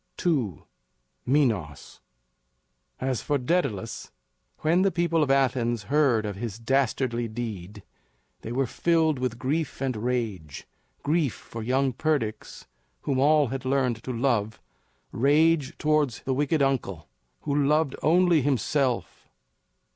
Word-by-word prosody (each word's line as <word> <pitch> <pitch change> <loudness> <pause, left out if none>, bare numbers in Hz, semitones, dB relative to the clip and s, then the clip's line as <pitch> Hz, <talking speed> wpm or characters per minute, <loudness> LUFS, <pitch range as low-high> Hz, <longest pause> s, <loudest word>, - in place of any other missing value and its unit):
II. 125 - 0 0.6
MINOS. 115 - 0 1.0
As 130 -4 -1
for 145 - 0
Daedalus, 125 - -2 0.5
when 165 +4 +3
the 195 - +4
people 170 -2 +1
of 145 - +1
Athens 120 -4 +1
heard 130 -8 +3
of 105 -2 -4
his 110 -1 -5
dastardly 120 -1 0
deed, 105 -4 -6 0.6
they 115 - -7
were 135 +2 +1
filled 160 +2 +1
with 125 -2 -2
grief 145 +5 -2
and 130 -2 -1
rage 105 - -3 0.4
grief 150 -3 +1
for 115 - -9
young 130 +3 +1
Perdix, 120 -7 -2 0.4
whom 135 -2 -1
all 145 -1 +4
had 135 -1 -4
learned 130 -4 0
to 130 - -4
love; 115 -4 0 0.5
rage 150 +3 +2
towards 150 -5 +1
the 130 - -1
wicked 145 +2 +1
uncle, 110 - -1 0.3
who 145 - -2
loved 150 0 +2
only 175 -1 +4
himself. 135 -1 -1
130 Hz, 125 wpm, -26 LUFS, 115-150 Hz, 1.0 s, the